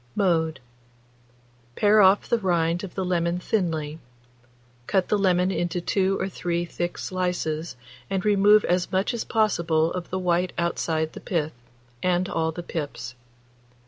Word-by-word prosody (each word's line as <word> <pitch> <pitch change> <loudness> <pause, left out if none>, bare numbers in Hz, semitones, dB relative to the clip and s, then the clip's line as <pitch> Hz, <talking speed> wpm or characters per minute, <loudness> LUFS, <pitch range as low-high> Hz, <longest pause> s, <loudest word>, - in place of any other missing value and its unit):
Mode. 160 -6 +1 1.2
Pare 210 +1 +5
off 190 +1 +5
the 235 - +2
rind 175 -2 +1
of 190 - -8
the 190 - -1
lemon 170 -1 0
thinly; 165 -6 -2 0.9
cut 190 -2 +1
the 210 - +3
lemon 185 -1 +2
into 175 -1 -1
2 190 +2 +1
or 190 - -1
3 175 -2 -2
thick 175 0 -4
slices, 175 -4 -2 0.3
and 195 0 -2
remove 210 +1 +5
as 180 0 0
much 190 +6 +1
as 235 - -2
possible 170 -7 +1
of 180 -1 -5
the 185 - -2
white 180 0 0
outside 160 -2 -1
pith, 160 -3 -1 0.5
and 180 +2 +1
all 160 -2 -1
the 175 +2 -7
pips. 145 -8 -5
180 Hz, 145 wpm, -25 LUFS, 165-190 Hz, 1.2 s, Pare